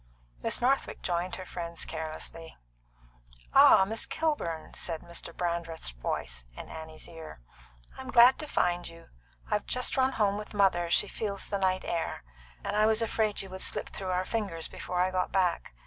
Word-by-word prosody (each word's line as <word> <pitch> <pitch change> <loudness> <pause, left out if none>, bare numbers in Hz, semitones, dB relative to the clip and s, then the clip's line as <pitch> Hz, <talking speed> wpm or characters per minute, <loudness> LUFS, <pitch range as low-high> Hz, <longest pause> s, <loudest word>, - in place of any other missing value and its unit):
Miss - - 0
Northwick 270 +3 +1
joined 175 +1 -1
her 185 - -7
friends 170 -2 -4
carelessly. 160 +1 -6 1.0
"Ah, 190 - +8
Miss 225 +3 -2
Kilburn," 295 - -2
said 165 -2 -4
Mr. 170 0 -7
Brandreth's 170 - -3
voice - - -4
at - - -7
Annie's 160 0 -8
ear, 165 - -10 0.6
"I'm 260 0 -7
glad 245 +1 +7
to 305 - -4
find 175 -8 +1
you. 165 0 -12 0.4
I've 210 - 0
just 250 0 +1
run 265 0 +3
home 205 -2 +2
with 210 0 -8
mother 185 -4 +3
she - - +3
feels 200 -3 -4
the 200 - -1
night 185 -1 +1
air 165 - -2 0.4
and - - -2
I 215 +1 +5
was 220 +1 +3
afraid 215 -2 0
you 190 - -10
would 190 0 -7
slip - - -1
through 190 -1 -5
our 185 0 +1
fingers 195 -8 -2
before 180 - -4
I 185 +1 +3
got 185 -1 0
back. 180 - +1
185 Hz, 175 wpm, -30 LUFS, 165-210 Hz, 1.0 s, Ah